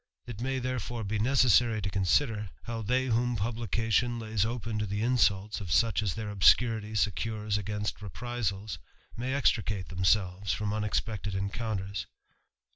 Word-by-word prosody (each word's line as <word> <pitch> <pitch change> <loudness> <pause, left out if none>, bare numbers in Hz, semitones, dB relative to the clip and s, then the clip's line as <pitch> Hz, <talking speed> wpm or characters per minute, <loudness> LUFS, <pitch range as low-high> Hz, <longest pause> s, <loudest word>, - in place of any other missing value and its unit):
It 115 -2 -7
may 135 +1 -1
therefore 120 -2 -3
be 105 +1 -2
necessary 120 -2 +4
to 100 -1 -2
consider, 105 +2 +1
how 115 -1 -4
they 125 +5 +1
whom 120 0 +1
publication 115 +2 0
lays 110 -3 -1
open 115 -1 -2
to 105 - -1
the 105 +2 -2
insults 105 -4 +2
of 90 -5 -6
such 115 +7 +3
as 100 -6 -1
their 110 -2 -4
obscurity 110 +2 +3
secures 105 +2 0
against 105 0 -3
reprisals, 105 -1 -4 0.4
may 130 +3 -2
extricate 105 -8 +1
themselves 95 +1 +1
firom 105 -1 -2
unexpected 105 -1 -2
encounters. 100 -2 -3
110 Hz, 140 wpm, -29 LUFS, 100-120 Hz, 0.4 s, necessary